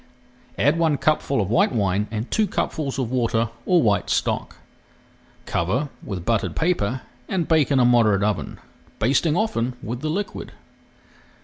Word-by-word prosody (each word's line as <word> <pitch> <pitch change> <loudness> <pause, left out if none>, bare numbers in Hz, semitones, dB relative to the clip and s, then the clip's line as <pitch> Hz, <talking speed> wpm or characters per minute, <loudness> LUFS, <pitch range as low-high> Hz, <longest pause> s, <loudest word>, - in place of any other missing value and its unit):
Add 165 - +2
one 160 -3 +2
cupful 145 -4 +1
of 100 -1 -1
white 115 - +3
wine 105 -3 0
and 110 +2 -4
two 215 -1 +2
cupfuls 150 -6 -2
of 125 -3 -2
water 115 -3 +1 0.2
or 180 -4 +4
white 100 -5 +1
stock. - - -1 0.9
Cover 120 - -1
with 90 -4 -5
buttered 115 -3 0
paper 130 - 0 0.3
and 180 -4 -1
bake 160 -4 +3
in 140 -2 +3
a 125 - +5
moderate 110 -5 +4
oven, 105 0 -2 0.4
basting 145 +7 +2
often 130 - -1
with 120 +3 -5
the 155 - -2
liquid. 200 +6 -4
125 Hz, 150 wpm, -23 LUFS, 110-155 Hz, 0.9 s, a